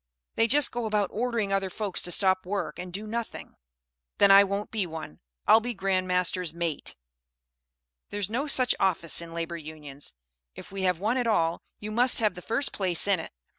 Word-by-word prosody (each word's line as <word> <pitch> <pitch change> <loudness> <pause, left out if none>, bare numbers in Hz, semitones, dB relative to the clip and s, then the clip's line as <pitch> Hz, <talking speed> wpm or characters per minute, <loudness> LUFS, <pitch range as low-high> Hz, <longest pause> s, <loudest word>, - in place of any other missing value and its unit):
They 225 - +2
just 290 +5 +3
go 240 -2 -3
about 210 -3 0
ordering 225 -3 -1
other 195 -1 0
folks 200 0 -3
to 175 - -3
stop 185 +1 +2
work 200 +2 -3
and 180 0 -6
do 200 +4 -5
nothing." 230 +1 -5 0.6
"Then 200 -1 +6
I 200 +1 +9
won't 200 +1 -3
be 210 -5 -1
one. 160 - -8 0.3
I'll 220 - +7
be 240 +1 -4
Grand 190 -1 0
Master's 180 -2 0
Mate." 170 -3 -3 1.1
"There's 205 -2 -2
no 250 +7 -2
such 255 -3 +4
office 170 -3 +3
in 170 0 -9
Labor 170 0 -3
Unions. 150 - -9 0.4
If - - -11
we 195 0 -5
have 180 -2 -1
one 220 +6 0
at 245 -2 0
all, 170 -6 +1 0.2
you 210 +1 -7
must 245 +3 +3
have 215 -4 +2
the 180 - -9
first 275 +9 -1
place 185 -2 +1
in 195 -3 +3
it." - - -7
195 Hz, 195 wpm, -27 LUFS, 175-220 Hz, 1.1 s, I